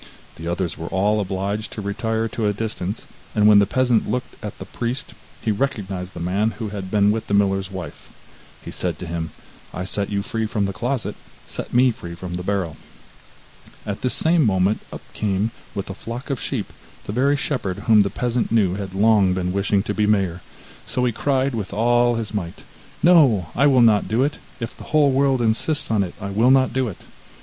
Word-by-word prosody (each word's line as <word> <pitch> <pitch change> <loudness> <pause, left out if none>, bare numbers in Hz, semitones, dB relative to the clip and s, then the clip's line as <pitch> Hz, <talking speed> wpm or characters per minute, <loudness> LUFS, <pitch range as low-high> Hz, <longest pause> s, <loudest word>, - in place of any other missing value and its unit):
The 80 - -6
others 85 +1 -2
were 80 - -5
all 105 +4 +1
obliged 100 +2 -2
to - - -6
retire 110 +3 -1
to 110 0 -1
a 105 - +1
distance, 105 -1 -4 0.3
and 105 -1 +5
when 105 -1 +8
the 100 - +3
peasant 125 0 +2
looked 125 0 -2
at 105 - -6
the - - -8
priest, 120 +2 -4 0.3
he 110 - +1
recognized 100 -6 -3
the - - -6
man 95 +6 +1
who 110 -2 -4
had 100 -2 -6
been 105 0 +4
with 110 +1 -2
the 100 - +1
miller's 95 -1 +2
wife. 95 -3 -8 0.6
He - - -6
said - - -2
to - - -6
him: 80 -1 -3 0.5
'I 90 - -3
set 100 +1 0
you 100 -1 -1
free 115 -1 -2
from 105 -2 0
the 100 - -3
closet, 120 +6 -2 0.3
set - - -5
me 125 +1 +5
free 85 -6 -8
from 90 0 -7
the 90 - -3
barrel.' 95 -3 -2 1.1
At 100 -1 -4
this 125 - +1
same 165 0 +4
moment 95 -2 +2
up - - -8
came, 105 +1 0 0.2
with 100 - -3
a 95 - -5
flock 120 +7 -6
of 135 - -2
sheep, - - -3 0.3
the - - -4
very 140 +4 +3
shepherd 125 -10 -3
whom 110 -2 +6
the 100 - +1
peasant 120 +1 -1
knew 105 -6 +3
had 95 -1 -5
long 100 -3 +4
been 90 -1 -1
wishing 100 0 +1
to 105 - -2
be 105 0 +1
mayor, 95 -4 +1 0.5
so 125 - 0
he 120 - +2
cried 135 +2 0
with 105 -4 -4
all 120 +2 +3
his 110 -2 -3
might: 90 -5 -4 0.4
'No, 135 - +5
I 140 +3 +4
will 130 -3 +5
not 110 -3 +4
do 115 +4 +2
it; 145 +2 -1 0.2
if 115 0 -5
the - - -11
whole 150 -2 +3
world 135 -2 +2
insists 145 +6 +1
on 110 -2 +3
it, 90 -3 -3
I 100 0 -5
will 110 +5 +3
not 130 -1 +4
do 130 -1 +1
it! 100 - -6
105 Hz, 210 wpm, -22 LUFS, 95-120 Hz, 1.1 s, when